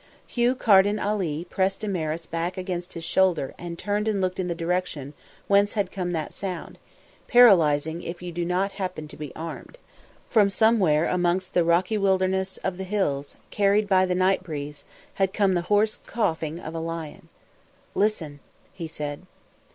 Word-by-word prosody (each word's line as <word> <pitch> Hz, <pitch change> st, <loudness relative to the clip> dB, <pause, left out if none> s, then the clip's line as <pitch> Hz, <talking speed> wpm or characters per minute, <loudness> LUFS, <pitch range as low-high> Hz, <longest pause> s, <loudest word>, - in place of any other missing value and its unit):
Hugh 245 Hz, +1 st, +1 dB
Carden 205 Hz, -3 st, +4 dB, 0.5 s
pressed 195 Hz, 0 st, 0 dB
Damaris 165 Hz, -6 st, -2 dB
back 170 Hz, +3 st, -3 dB
against 180 Hz, -1 st, -4 dB
his 165 Hz, -, -7 dB
shoulder 175 Hz, -5 st, +1 dB
and 170 Hz, -1 st, -6 dB
turned 205 Hz, +3 st, -1 dB
and 210 Hz, -2 st, +1 dB
looked 185 Hz, -1 st, -1 dB
in 185 Hz, -, -1 dB
the 170 Hz, -, -2 dB
direction 165 Hz, -5 st, -2 dB, 0.3 s
whence 200 Hz, +1 st, +3 dB
had 205 Hz, -2 st, 0 dB
come 180 Hz, -3 st, -3 dB
that 160 Hz, -3 st, -3 dB
sound, 185 Hz, -3 st, -6 dB, 0.5 s
paralysing 165 Hz, -, +5 dB
if 170 Hz, +1 st, -6 dB
you 180 Hz, 0 st, -6 dB
do 170 Hz, +1 st, -3 dB
not 180 Hz, +3 st, 0 dB
happen 185 Hz, -6 st, -5 dB
to -, -, -11 dB
be 150 Hz, -3 st, -7 dB
armed. 165 Hz, -, -7 dB, 0.5 s
From 210 Hz, -4 st, +4 dB
somewhere 195 Hz, -8 st, +3 dB
amongst 180 Hz, +1 st, 0 dB
the 175 Hz, -, +4 dB
rocky 180 Hz, +6 st, +2 dB
wilderness 190 Hz, -1 st, +1 dB
of 185 Hz, -2 st, -2 dB
the 190 Hz, -, -4 dB
hills, 180 Hz, -8 st, -2 dB
carried 205 Hz, +1 st, +2 dB
by 185 Hz, -1 st, +4 dB
the 180 Hz, -, 0 dB
night 185 Hz, +1 st, +2 dB
breeze, 145 Hz, -4 st, -7 dB, 0.4 s
had 190 Hz, 0 st, +2 dB
come 200 Hz, -3 st, +2 dB
the 175 Hz, -, +1 dB
hoarse 210 Hz, +1 st, +2 dB
coughing 160 Hz, -7 st, -1 dB
of 160 Hz, -, -7 dB
a 165 Hz, -, -3 dB
lion. 165 Hz, -2 st, -6 dB, 0.6 s
"Listen," 170 Hz, -9 st, -1 dB, 0.3 s
he 175 Hz, -3 st, -6 dB
said. 150 Hz, +2 st, -6 dB
185 Hz, 165 wpm, -25 LUFS, 165-195 Hz, 0.6 s, paralysing